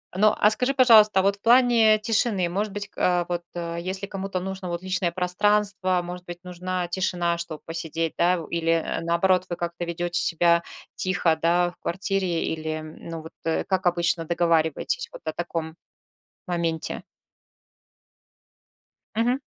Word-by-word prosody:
Ну, 210 +2 +4
а 210 - +5
скажи, 250 +5 0
пожалуйста, 220 -6 +6
а - - +2
вот 200 0 +2
в 200 - -24
плане 230 -3 +5
тишины, 215 -4 +1
может 200 +4 -2
быть, 205 0 -4
ка 175 -1 +1
вот, 175 -1 -2 0.4
если 190 +3 -4
кому-то 195 -1 -4
нужно 190 0 -5
вот 170 0 -3
личное 185 -2 -1
пространство, 185 +1 +1
может 180 0 -8
быть, 175 -1 -8
нужна 180 0 -3
тишина, 175 -1 0
чтоб 170 -2 -6
посидеть, 165 0 -3
да. 180 +1 +3
В 165 - -7
или, 165 -1 0 0.2
наоборот, 180 +2 +2
вы 175 - -3
как-то 170 0 -4
ведете 175 +1 -2
себя 170 0 +3 0.3
тихо, 185 -4 +1
да, 175 +1 +2
в - - -24
квартире 185 -1 -1
или, 155 0 -3
ну, 160 +1 -8
вот 160 - -11 0.3
как 190 -1 0
обычно 170 -1 +2
договариваетесь 170 - +1
вот - - -11
о - - -2
таком 165 -2 -4 0.7
моменте? 170 -2 -2 2.2
Мгм. 245 +4 +1
180 Hz, 145 wpm, -25 LUFS, 170-195 Hz, 2.2 s, пожалуйста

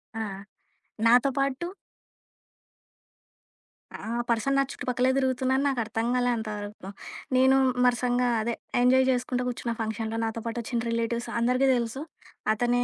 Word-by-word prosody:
ఆ! 225 - -2 0.8
నాతో 245 +3 +5
పాటు 275 +5 -1 2.3
ఆ! - - -15 0.3
పర్సన్ 235 +4 +1
నా 275 - +4
చుట్టుపక్కలే 250 +1 0
తిరుగుతున్నారని 265 +1 +1
నాకు 270 -3 0
అర్థంకాలే 240 +3 0
అంతవరకు. 210 -2 -6 0.5
నేను 260 +1 +5 0.3
మరసంగా 245 0 +2
అదే 235 +2 -1 0.3
ఎంజాయ్ 260 +1 +5
జేసుకుంట 250 0 0
గూర్చున్న, 240 -1 -3
ఫంక్షన్‌లో. 220 0 -3
నాతో 225 +1 -3
పాటొచ్చిన 235 +1 -2
రిలేటివ్స్ 230 +1 -1
అందరికీ 250 +3 +2
తెలుసు 235 +2 -2 0.5
అతనే 245 +2 +1
245 Hz, 110 wpm, -27 LUFS, 230-260 Hz, 2.3 s, నాతో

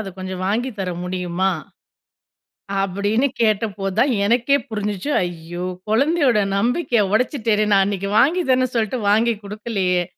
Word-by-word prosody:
அத 200 - -5
கொஞ்சம் 185 0 -5
வாங்கி 240 +6 0
தர 185 -2 -2
முடியுமா? 180 +1 -1 1.3
அப்டின்னு 200 +7 +1
கேட்டப்போதுதா 210 -2 +1 0.2
எனக்கே 245 +6 +3
புரிஞ்சுச்சு. 210 +3 -3
ஐயோ! 175 0 -5 0.3
குழந்தையோட 275 -1 +3 0.2
நம்பிக்கைய 240 +1 +1
உடைச்சுட்டேனே! 220 -3 +1
நான் 195 -1 +5
அன்னிக்கு 200 -1 -2
வாங்கி 340 +8 +3
தரன்னு 255 0 +3
சொல்ட்டு 230 +2 0
வாங்கி 230 +3 +3
குடுக்கலையே! 200 -4 -1
210 Hz, 120 wpm, -21 LUFS, 190-240 Hz, 1.3 s, நான்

